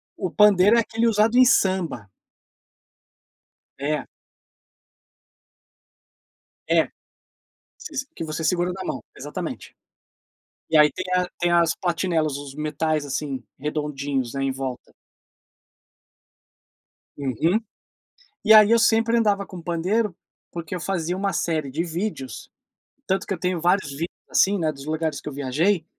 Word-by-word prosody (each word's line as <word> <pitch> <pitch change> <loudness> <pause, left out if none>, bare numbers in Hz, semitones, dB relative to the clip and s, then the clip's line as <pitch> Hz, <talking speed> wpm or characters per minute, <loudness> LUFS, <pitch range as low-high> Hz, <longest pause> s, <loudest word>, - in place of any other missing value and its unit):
O 185 - -3
pandeiro 210 +2 +5
é - - +5
aquele 230 +1 0
usado 225 +2 +3
em 255 - +8
samba. 185 - +1 1.7
É. 150 +2 -2 2.6
É, - - +4 1.4
você 155 0 -4
que - - -3
segura 180 0 +1
na 190 +1 -6
mão - - -4
Exatamente. - - -6 1.0
E 160 - +4
aí 150 -1 +6
tem 185 +4 -5
a 180 0 +2
tem 175 0 +1
as 170 -1 +3
platinelas, 165 -4 0
os 140 -1 -9
metais, 150 0 -1
assim, 135 -1 -3 0.2
redondinhos 140 -3 -2
aí 135 0 -1
em 135 - 0
volta. 130 -1 -6 2.3
Uhum 145 - +1 0.9
E 220 - +6
aí 215 0 +8
eu 230 - +6
sempre 230 +1 +3
andava 200 -3 +1
com 185 - -9
pandeiro, 180 +4 0 0.4
porque 170 0 -5
eu 180 - -4
fazia 175 +1 -2
uma 195 +1 -1
série 155 -5 -1
de 160 +5 -2
vídeos, 165 - -5 0.6
tanto 190 +1 0
que - - -1
eu 180 - -5
tenho 180 -1 -1
vários 175 -1 +2 0.4
assim, 200 +1 +3
né, 160 -2 +1
dos 140 -2 -11
lugares 155 -1 -2
que - - -6
eu - - -9
viajei, 155 +7 0
170 Hz, 130 wpm, -24 LUFS, 150-195 Hz, 2.6 s, em